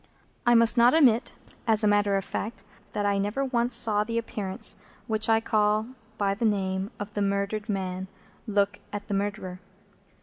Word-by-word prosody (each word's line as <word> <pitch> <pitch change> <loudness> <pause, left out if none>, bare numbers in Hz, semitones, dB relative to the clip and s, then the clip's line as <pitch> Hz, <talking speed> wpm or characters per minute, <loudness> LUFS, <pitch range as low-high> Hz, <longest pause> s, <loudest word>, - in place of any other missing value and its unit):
I 240 - +6
must 230 +1 +5
not 245 +4 +6
omit, 250 -7 +4 0.3
as 220 -1 +3
a - - +4
matter 205 -1 +3
of 195 - -3
fact, 225 +3 -5 0.3
that 205 - -1
I 200 -1 +1
never 210 +8 -1
once 240 -2 +1
saw 220 -3 +3
the 230 +1 -3
Appearance 205 -4 -2 0.3
which 220 0 0
I 225 0 +5
call 215 0 +1 0.3
by 200 -1 +1
the 210 +4 -5
name 195 -2 0
of 205 +1 -6
the 205 - -2
murdered 200 +2 -1
man 190 -2 -3 0.4
look 205 -1 +1
at 205 0 -6
the - - -1
Murderer. 195 -2 -3
210 Hz, 175 wpm, -27 LUFS, 200-225 Hz, 0.4 s, I